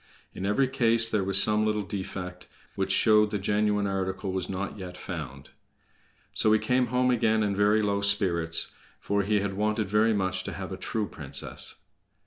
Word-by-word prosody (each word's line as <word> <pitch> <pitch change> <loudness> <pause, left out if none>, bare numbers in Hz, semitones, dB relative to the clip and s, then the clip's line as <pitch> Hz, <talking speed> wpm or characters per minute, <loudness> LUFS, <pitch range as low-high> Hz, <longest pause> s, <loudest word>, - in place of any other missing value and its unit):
In 95 - -4
every 130 +6 +2
case 115 -3 +3
there 105 -3 0
was 95 +1 +2
some 105 +1 +3
little 105 -1 0
defect, 95 -2 -6 0.3
which - - -2
showed 105 -1 +4
the 105 - -2
genuine 105 +1 0
article 95 0 -2
was 95 0 -3
not 95 +1 -4
yet 90 -3 -8
found. 70 -8 -7 0.8
So 110 - +3
he - - +5
came 125 +2 +1
home 125 +1 +1
again 110 -2 +2
in 100 -1 -1
very 105 +2 +3
low 100 -1 0
spirits, 90 -5 +2 0.3
for 100 0 0
he 105 +1 +1
had 100 -1 -2
wanted 105 +1 -1
very 110 +2 +3
much 95 -1 -1
to - - -5
have 95 -1 -6
a - - -3
true 105 +3 -3
princess. 70 -2 -3
100 Hz, 180 wpm, -27 LUFS, 95-110 Hz, 0.8 s, he